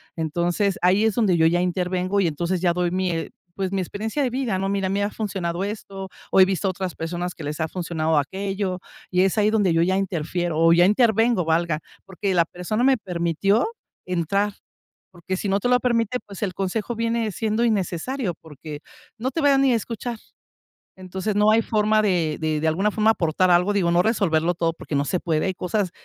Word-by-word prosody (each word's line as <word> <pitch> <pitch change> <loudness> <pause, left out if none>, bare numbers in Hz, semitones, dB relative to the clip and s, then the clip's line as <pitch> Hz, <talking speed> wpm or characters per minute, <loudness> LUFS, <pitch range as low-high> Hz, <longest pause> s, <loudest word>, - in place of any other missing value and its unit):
Entonces, 175 +5 0
ahí 185 +4 +4
es 220 - +2
donde 210 -7 +3
yo 160 - +4
ya 175 +2 +2
intervengo 180 +2 0
y 175 - +2
entonces 170 +4 -2
ya 175 -2 +3
doy 180 0 0
mi, 185 0 0
eh, 165 -1 -3 0.3
pues, 190 -1 -2
mi 190 - 0
experiencia 220 - -3
de 255 - +1
vida, 245 -6 -1
¿no? 195 - -1
"Mira, 195 -1 0
me 200 +1 0
ha 205 - 0
funcionado 190 -4 -3
esto, 195 -2 -6 0.2
o - - +4
he 185 - +9
visto 195 +1 -1
otras 185 -1 -4
personas 175 +2 -4
que 160 - -9
les 150 +2 -4
ha 160 - 0
funcionado 160 -3 -1
aquello". 190 +4 -2 0.3
Y 180 0 +3
es 195 +3 +1
ahí 210 0 +4
donde 205 -6 +2
yo 165 - +3
ya 185 +2 +2
interfiero 175 -3 -2
o 165 0 +5
ya 175 +1 +5
intervengo, 225 -1 +3
valga. 165 -1 +1 0.3
Porque 195 0 -2
la 170 -2 +3
persona 180 +8 -3
me 270 -1 +4
permitió 180 +2 0 0.4
entrar. 190 +4 0 0.6
Porque 180 +1 -5
si 200 - -3
no 195 +1 +2
te 245 - -1
lo 250 0 +4
permite, 235 0 +1
pues, 200 -2 -10
el 185 - -2
consejo 200 +5 -2
viene 230 -1 -1
siendo 220 +1 0
innecesario, 205 +1 -1
porque 150 -1 -9 0.4
no 255 +4 -2
te 325 - -2
va 285 -2 +4
ni 270 -2 +4
a - - +3
escuchar. 230 +1 -4 0.8
Entonces, 190 +3 -4
no 210 +1 +5
hay 225 +1 +4
forma 215 0 +2
de 170 -7 +1
de 155 -1 0
de 160 - +1
alguna 195 +7 +1
forma, 215 +1 +3
aportar 180 0 +1
algo, 180 +3 +4
digo, 185 -4 +1
no 175 +1 +4
resolverlo 175 -6 +1
todo 165 -1 0
porque 155 - -7
no 140 0 +2
se 180 - -1
puede, 160 0 0
hay 190 - -1
cosas 185 +1 -1
190 Hz, 210 wpm, -23 LUFS, 170-210 Hz, 0.8 s, he